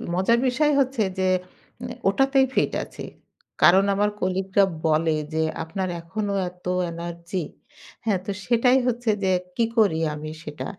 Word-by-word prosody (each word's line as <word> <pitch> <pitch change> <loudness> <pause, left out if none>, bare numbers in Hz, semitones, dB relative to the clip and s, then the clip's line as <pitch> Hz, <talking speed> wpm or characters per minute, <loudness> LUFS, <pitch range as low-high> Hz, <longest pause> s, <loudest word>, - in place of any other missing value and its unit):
মজার 230 +6 +3
বিষয় 295 +4 +2
হচ্ছে 260 -4 +1 0.2
যে 185 - +2 0.5
উনে 245 0 -6
ওটাতেই 270 +5 +3
ফিট - - +1
আছি। - - -9 0.6
কারণ 190 +3 +7
আমার 205 +1 +2
কলিগরা 190 +1 +1 0.2
বলে 160 0 +2 0.2
যে, 160 0 +1 0.2
"আপনার 185 +3 -3
এখনো 200 +4 -3 0.2
এত 180 0 -23 0.3
এনার্জি?" 170 +1 -5 0.6
হ্যাঁ? 200 -4 +1
তো 200 - -2
সেটাই 245 +2 +4
হচ্ছে 240 -1 -1
যে, 190 - +2 0.2
কী 230 - +2
করি 195 -8 +4
আমি 155 +1 -6
সেটা। 150 0 -6
195 Hz, 145 wpm, -24 LUFS, 170-235 Hz, 0.6 s, কারণ